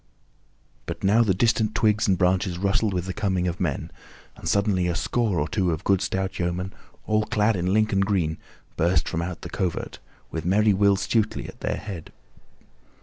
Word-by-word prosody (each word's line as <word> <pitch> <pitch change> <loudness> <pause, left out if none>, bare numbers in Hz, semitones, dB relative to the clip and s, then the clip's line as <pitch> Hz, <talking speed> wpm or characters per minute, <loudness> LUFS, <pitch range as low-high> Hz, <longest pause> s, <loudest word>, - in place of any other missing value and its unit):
But - - -5
now 105 +4 +4
the 100 -6 +2
distant 110 +1 +2
twigs 110 -1 +2
and 95 -2 +3
branches 90 0 +1
rustled 100 +3 +1
with 90 -2 -2
the 95 - -4
coming 95 -3 0
of 85 0 -3
men, 80 -7 -2 0.4
and - - -5
suddenly 100 -3 +2
a 85 - 0
score 105 -1 0
or 75 - 0
two 95 -1 0
of 80 -2 -2
good 100 -1 +2
stout 95 0 -2
yeomen, 90 +2 -2 0.3
all 110 0 +2
clad 105 +1 +2
in 90 0 -1
Lincoln 105 -1 +2
green, 95 -6 0 0.4
burst 85 +3 +2
from 80 - -2
out 85 0 -5
the - - -7
covert, 90 -4 -3 0.3
with 80 - -3
merry 105 +4 +3
Will 100 +1 +4
Stutely 110 +2 0
at - - -11
their - - -1
head. 95 -7 -7
95 Hz, 185 wpm, -25 LUFS, 90-105 Hz, 0.4 s, now